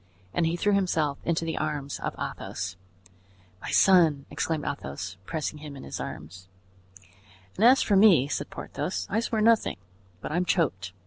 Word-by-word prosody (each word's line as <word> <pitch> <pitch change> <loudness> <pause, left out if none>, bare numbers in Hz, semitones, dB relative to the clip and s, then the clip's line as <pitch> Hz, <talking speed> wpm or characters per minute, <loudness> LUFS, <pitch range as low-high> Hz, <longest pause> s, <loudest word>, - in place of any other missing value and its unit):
And 165 - +1
he 165 - 0
threw 205 +4 +1
himself 160 -7 +1
into 165 0 0
the 160 - -2
arms 145 -2 -3
of - - -4
Athos. 90 - -5 0.9
"My - - -6
son!" 165 -7 +4
exclaimed 160 -2 -2
Athos, 90 - -5
pressing 155 -1 -3
him 145 -1 -9
in - - -10
his - - -6
arms. 90 +5 -8 1.1
"And 210 - -1
as 255 +3 +7
for 205 - +2
me," 190 -9 +6
said 140 - -3
Porthos, 95 0 -4
"I 215 - +2
swear 225 -1 -1
nothing, 225 0 +3 0.4
but - - -6
I'm 175 +3 +1
choked. 105 - 0
160 Hz, 165 wpm, -27 LUFS, 140-190 Hz, 1.1 s, as